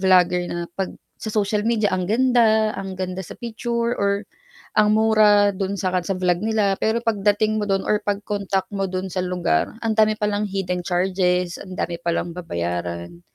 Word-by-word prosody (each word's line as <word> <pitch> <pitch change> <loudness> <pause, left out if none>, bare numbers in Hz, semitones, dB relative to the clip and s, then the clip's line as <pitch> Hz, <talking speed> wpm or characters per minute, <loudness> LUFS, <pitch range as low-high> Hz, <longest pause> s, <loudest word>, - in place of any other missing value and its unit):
vlogger 180 -2 +4
na 175 0 -3 0.2
'pag 190 - -3 0.2
sa 220 - -4
social 210 0 0
media, 215 -4 +1
ang 185 -1 -1
ganda, 225 -2 +3
ang 195 -2 -6
ganda 185 0 -3
sa 190 - -9
picture 235 0 -2
or 200 +1 +1 0.5
ang 215 0 +5
mura 210 -2 +5
do'n 195 +1 -3
sa 185 -2 -1
kad 180 -2 -1
sa 195 - 0
vlog 180 -1 +1
nila. 215 -2 +1
Pero 230 +2 0
pagdating 215 0 +1
mo 205 - -2
do'n 195 -1 +1
or 210 0 +1
pag-contact 200 -1 -2
mo 195 -1 -1
do'n 185 0 -4
sa 185 - -1
lugar, 180 - 0
ang 225 - +2
dami 215 0 +3
palang 210 -1 -1
hidden 185 -2 -2
charges. 180 -1 0
Ang 185 -1 -9
dami 170 0 -3
palang 170 0 -1
babayaran. 85 - -4
195 Hz, 180 wpm, -22 LUFS, 180-215 Hz, 0.5 s, ang